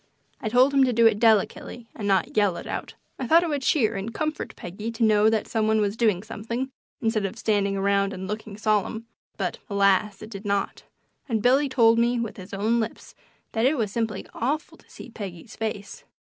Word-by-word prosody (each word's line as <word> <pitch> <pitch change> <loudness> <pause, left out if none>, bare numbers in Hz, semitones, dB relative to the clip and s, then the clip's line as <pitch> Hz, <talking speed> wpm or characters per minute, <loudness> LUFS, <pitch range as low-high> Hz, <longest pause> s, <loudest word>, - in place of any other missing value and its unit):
I 215 - -2
told 255 +4 +4
him 275 -1 +5
to 250 - 0
do 230 0 +4
it 215 -2 +4
delicately, 225 +1 +1
and 205 - -4
not 195 -3 +1
yell 205 -5 +2
it - - -7
out. - - -5 0.2
I 260 - -3
thought 335 +5 +6
it 340 - -2
would 290 -2 -1
cheer 240 -5 +2
and 195 +4 -4
comfort 310 +5 -3
Peggy 205 +6 -6
to 230 - -1
know 215 0 +5
that 220 -1 0
some 220 -2 0
one 220 0 +3
was 205 -1 0
doing 215 -6 +1
something, 230 +4 -4 0.3
instead 225 -2 0
of 195 +3 -3
standing 200 -3 +1
around 200 0 +1
and 190 -1 -6
looking 210 0 -6
solemn, 215 +1 0 0.3
but, - - -3
alas! 200 0 +2
it 215 - -10
did 200 -1 -7
not, 200 -1 -1 0.5
and 220 -3 0
Billy 270 +3 +4
told 230 -3 +4
me 240 +1 +2
with 230 -2 -4
his 185 0 -10
own 215 +4 +1
lips 225 0 -5 0.4
that 225 +3 +2
it 295 +2 +1
was 215 -4 -1
simply 220 -3 -2
awful 290 +7 -2
to - - -24
see - - -11
Peggy's 200 -1 -8
face. 210 -3 -5
220 Hz, 210 wpm, -25 LUFS, 200-235 Hz, 0.5 s, thought